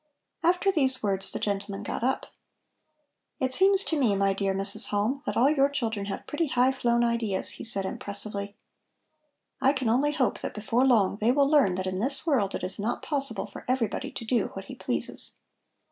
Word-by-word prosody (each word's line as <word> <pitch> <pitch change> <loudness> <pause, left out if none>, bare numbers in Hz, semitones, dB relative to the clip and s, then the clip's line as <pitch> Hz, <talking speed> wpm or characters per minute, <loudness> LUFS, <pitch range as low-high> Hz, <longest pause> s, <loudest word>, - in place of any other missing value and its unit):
After 360 +3 +3
these 265 -8 +2
words 195 -2 0
the - - -3
gentleman 200 0 -3
got 215 - -4
up. 260 +2 0 1.1
"It 260 -2 0
seems 390 +4 +5
to 320 -5 -1
me, 225 -7 +3
my 195 0 +2
dear 195 0 0
Mrs. 200 +3 -3
Halm, 215 +7 0
that - - -1
all 270 +4 +5
your 280 -2 +3
children 225 -7 -2
have 195 - -5
pretty 325 +2 -1
high 255 0 +3
flown 240 -2 +1
ideas," 235 -5 -1
he - - -8
said 200 -4 -1
impressively. 200 +1 -4 1.1
"I 270 - +4
can 260 -5 -1
only 280 +6 +2
hope 260 -5 0
that - - -5
before 230 +5 +1
long 205 -6 +3
they 220 +3 +3
will 280 +1 +3
learn 280 -11 +4
that 185 0 -3
in 185 0 -2
this 270 +6 0
world 245 - +1
it - - -5
is 190 - -4
not 215 +4 -2
possible 275 -8 -1
for - - -10
everybody 250 -4 -1
to 230 - -7
do 235 +1 +1
what - - -6
he - - -9
pleases." - - -2
235 Hz, 195 wpm, -27 LUFS, 200-270 Hz, 1.1 s, seems